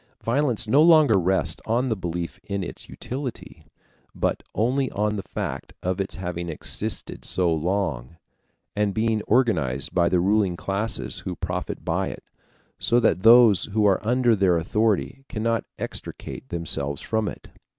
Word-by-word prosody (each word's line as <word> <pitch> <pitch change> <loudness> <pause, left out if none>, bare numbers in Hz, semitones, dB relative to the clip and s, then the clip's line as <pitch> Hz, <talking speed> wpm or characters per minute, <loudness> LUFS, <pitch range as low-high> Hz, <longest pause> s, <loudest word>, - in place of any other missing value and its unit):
Violence 120 -2 0
no 140 +7 +5
longer 155 -8 +6
rests 90 -2 0
on 120 +4 +1
the 110 - +1
belief 85 0 -4
in 100 -1 -3
its 85 - -8
utility, 130 -1 -7 0.5
but - - -1
only 130 +4 +1
on 105 +1 -1
the 100 - -3
fact - - -5
of 90 +2 0
its 95 - -4
having 85 -1 -4
existed 80 - -4
so 90 -3 +1
long, 85 -4 -2 0.6
and 105 -1 0
being 110 -1 +1
organized 80 - +1
by 85 -1 +3
the 90 - +2
ruling 95 -1 +2
classes 100 +5 -3
who 90 - -5
profit - - -4
by - - 0
it, - - -7 0.6
so 120 - +3
that 90 -6 +2
those 115 -2 +7
who 105 0 0
are 100 -2 +3
under 120 +1 +3
their 95 -4 +3
authority 110 +8 0
cannot 115 +1 -1
extricate - - -6
themselves 70 -4 -3
from 110 -1 -1
it. - - -11
105 Hz, 150 wpm, -24 LUFS, 90-115 Hz, 0.6 s, those